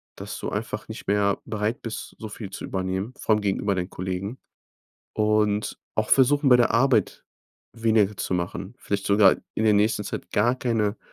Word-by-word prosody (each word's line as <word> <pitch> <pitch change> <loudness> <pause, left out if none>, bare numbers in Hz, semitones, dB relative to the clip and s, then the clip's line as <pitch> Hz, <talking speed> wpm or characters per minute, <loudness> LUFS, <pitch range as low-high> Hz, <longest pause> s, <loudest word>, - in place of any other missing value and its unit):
dass - - -7
du - - -3
einfach - - -4
nicht - - -9
mehr 100 0 +2
bereit 110 +2 -2
bist, 115 -1 -6
so 110 - -6
viel 105 -2 -7
zu 95 - -7
übernehmen, 95 +4 -3
vor 110 - +1
allem 105 - +1
gegenüber 100 0 0
deinen 90 0 -3
Kollegen. 95 +6 -4 0.8
Und 105 -1 +1 0.2
auch 110 0 0
versuchen, 140 +1 +4
bei 125 - +8
der 120 - +3
Arbeit 115 -2 +2 0.5
weniger 110 -3 +2
zu - - -2
machen. 90 +4 -3
Vielleicht 100 -1 -3
sogar 100 -1 +6 0.2
in 110 - 0
der 105 - +5
nächsten 105 0 +2
Zeit 90 - -6
gar 120 +5 +2
keine 115 -4 0
105 Hz, 180 wpm, -25 LUFS, 100-115 Hz, 0.8 s, bei